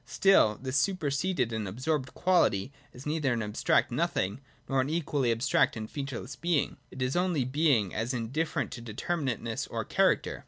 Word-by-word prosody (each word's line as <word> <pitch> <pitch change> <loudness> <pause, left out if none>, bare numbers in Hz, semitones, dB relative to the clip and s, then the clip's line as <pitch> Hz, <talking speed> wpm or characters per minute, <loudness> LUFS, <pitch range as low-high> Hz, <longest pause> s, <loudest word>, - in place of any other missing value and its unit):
Still 150 - +4
this 130 +1 -2
superseded 165 - 0
and 110 -2 -2
absorbed 130 +6 -2
quality 140 - +2 0.2
is 125 - -12
neither 150 -4 0
an 115 -1 -1
ab 105 0 -5
stract - - +2
nothing, 100 +8 -1 0.3
nor 135 -1 +2
an 130 - -2
equally 145 -6 0
abstract 115 0 +2
and 110 -1 -5
featureless 135 -1 -5
being: 170 -1 0
it 130 - -4
is 125 +1 -1
only 175 -7 +1
being 130 - +2
as 115 +3 -1
indifferent 130 +7 -2
to 120 - -7
determinateness 120 0 -3
or - - -3
character. - - +1
130 Hz, 165 wpm, -29 LUFS, 115-155 Hz, 0.3 s, Still